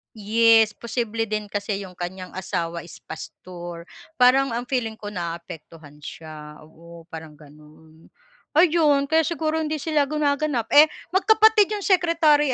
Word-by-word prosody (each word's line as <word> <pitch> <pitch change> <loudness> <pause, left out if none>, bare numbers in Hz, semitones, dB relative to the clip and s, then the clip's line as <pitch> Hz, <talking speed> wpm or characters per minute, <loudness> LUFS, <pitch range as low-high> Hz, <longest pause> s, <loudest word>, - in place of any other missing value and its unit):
Yes, 220 0 +3
posible 230 -1 -3
din 210 -1 -4
kasi 205 0 -3
'yong 185 -2 -11
kanyang 180 +1 -6
asawa 170 -3 -4
is 170 - -14
pastor 175 -2 -9 0.3
parang 260 -1 +3
ang 235 - -2
feeling 245 -4 -1
ko 210 -1 -8
naaapektuhan 165 -4 -8
siya 150 0 -10
oo 165 +2 -15
parang 160 -1 -9
gano'n. 155 +2 -19 0.4
Ayun 305 -4 +3
kaya 320 0 +3
siguro 320 -1 -2
hindi 310 -2 -2
sila 305 -2 +1
gumaganap 285 -4 -1 0.4
magkapatid 435 +2 +4
'yong 415 - -3
secretary 330 -7 +3
220 Hz, 130 wpm, -23 LUFS, -, 0.4 s, magkapatid